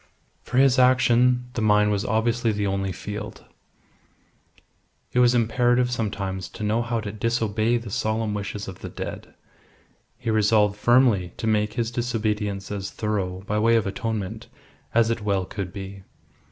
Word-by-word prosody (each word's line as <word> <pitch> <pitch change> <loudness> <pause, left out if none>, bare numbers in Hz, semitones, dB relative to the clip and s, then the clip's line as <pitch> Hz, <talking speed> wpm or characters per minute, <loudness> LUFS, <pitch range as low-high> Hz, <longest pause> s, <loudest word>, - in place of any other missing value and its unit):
For 125 - -4
his 135 -1 +5
action, 125 -1 +4
the 115 - -2
mine 105 -1 +4
was 100 0 0
obviously 115 +1 +1
the 105 -1 -1
only 95 -1 -1
field. 105 +3 -7 1.7
It 125 - +2
was 125 0 +5
imperative 120 +2 +2
sometimes 100 -5 -3
to - - -8
know 110 +3 +1
how 120 -1 -2
to 100 -1 -5
disobey 115 +1 0
the 115 -3 -7
solemn 110 +1 -1
wishes 105 0 -4
of 95 -2 -8
the - - -7
dead. - - -7 0.8
He 115 - -2
resolved 105 -1 +3
firmly 115 -5 +3
to - - -4
make 105 -1 +1
his 115 -1 -2
disobedience 105 -5 -2
as 100 -1 -4
thorough 95 -4 -3
(by 105 +1 -1
way 115 +2 +4
of 115 - +2
atonement) 110 -1 -4 0.4
as 115 0 +3
it 115 -1 -2
well 100 -3 0
could 95 -1 -5
be. 95 0 -8
110 Hz, 155 wpm, -24 LUFS, 100-115 Hz, 1.7 s, his